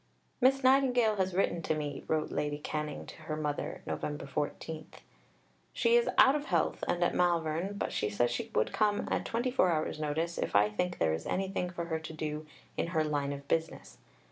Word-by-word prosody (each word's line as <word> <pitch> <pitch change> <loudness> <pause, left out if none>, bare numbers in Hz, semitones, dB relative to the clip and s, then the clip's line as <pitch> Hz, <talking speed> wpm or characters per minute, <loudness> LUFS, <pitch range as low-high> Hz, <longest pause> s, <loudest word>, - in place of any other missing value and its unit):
"Miss 270 +2 +4
Nightingale 250 -5 +4
has 190 -1 0
written 175 -3 +1
to 155 - 0
me," 150 -1 -4
wrote 155 -1 0
Lady 145 0 -1
Canning 150 0 -4
to - - -12
her 155 - -1
mother 150 -1 -3
(Nov. - - -4 0.2
14); 155 +3 -4 0.9
"she 465 0 +3
is 480 0 +4
out 265 - +8
of 295 0 -2
health - - 0
and 175 0 +1
at - - +2
Malvern, 170 +2 +1
but - - -2
says 105 +4 +1
she 120 - -3
would 110 - +1
come 210 -1 +1
at - - 0
twenty 240 +2 -1
four 185 -7 +3
hours' 155 -1 -1
notice 160 +3 -1
if - - -2
I 105 +1 +5
think 175 +12 -1
there 80 - +2
is 80 - -4
anything 190 -1 -1
for 175 -1 -4
her 160 -1 -2
to 160 0 -8
do 155 0 -4 0.3
in - - 0
her 155 - +4
'line 145 -2 -1
of 140 0 -7
business.' 165 +2 -2
160 Hz, 195 wpm, -31 LUFS, 150-195 Hz, 0.9 s, out